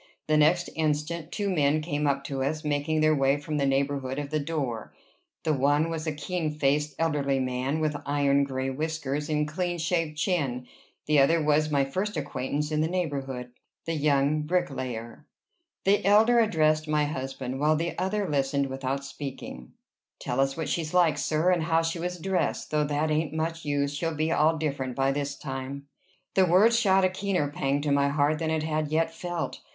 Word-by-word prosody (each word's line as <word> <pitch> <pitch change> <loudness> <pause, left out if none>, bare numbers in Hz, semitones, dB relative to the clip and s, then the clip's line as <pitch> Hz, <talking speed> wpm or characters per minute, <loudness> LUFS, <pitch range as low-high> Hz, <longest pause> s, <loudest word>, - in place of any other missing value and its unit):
The 155 - +2
next 160 +4 +4
instant, 155 +1 -1
two 205 -2 -2
men 155 -5 +2
came 150 -1 -1
up 140 0 0
to 135 -1 -4
us, 155 +3 -2
making 150 +1 0
their 155 0 +4
way 135 0 +3
from 150 +1 -4
the 140 -1 +1
neighborhood 135 -1 0
of 145 0 -4
the 155 - +1
door. 140 -7 -3 0.5
The 155 -1 +1
one 145 +4 +2
was 160 0 -4
a - - +1
keen 155 +2 -2
faced, 150 +1 +1
elderly 145 -4 +1
man, 130 +3 -1
with 155 -1 0
iron 140 -1 +2
gray 135 -1 -2
whiskers 150 0 -3
and 150 -1 +1
clean 175 +3 -2
shaved 165 -2 -1
chin; 140 -8 -1 0.4
the 150 -1 +4
other 160 +5 +4
was 150 0 +2
my 140 -2 +2
first 190 +10 -3
acquaintance 145 +3 -2
in 155 0 +1
the 160 - +2
neighborhood, 135 -8 -3 0.3
the 165 - -2
young 145 0 +2
bricklayer. 135 -7 -3 0.6
The 200 +1 +3
elder 220 +5 +5
addressed 155 -8 +2
my 150 -1 +2
husband, 135 -2 -4
while 155 +2 +3
the 165 +2 -2
other 195 +2 -1
listened 140 -2 0
without 135 +1 -3
speaking. 135 - -8 0.4
"Tell 125 - -3
us 135 +1 +1
what 160 -3 -2
she's 160 +2 -2
like, 165 -5 +4
sir, 155 +5 +2
and 175 -2 +2
how 165 0 +2
she 165 +1 -2
was 180 +1 -3
dressed 185 0 -1
though 150 -1 +2
that 150 +2 0
ain't 155 0 0
much 165 +1 -2
use. 145 -1 0
She'll 165 +2 -2
be 155 +2 0
all 160 0 +3
different 140 -5 -2
by 135 0 +2
this 140 0 -2
time." 135 0 -6 0.5
The 190 -1 +4
words 215 +7 +5
shot 195 -4 +4
a - - +3
keener 185 -6 -1
pang 140 0 0
to 145 0 -1
my 140 0 +3
heart 145 +1 +1
than 160 -1 -1
it 160 -1 0
had 155 -1 -1
yet 160 +2 0
felt. 175 0 -4
150 Hz, 190 wpm, -27 LUFS, 140-165 Hz, 0.6 s, elder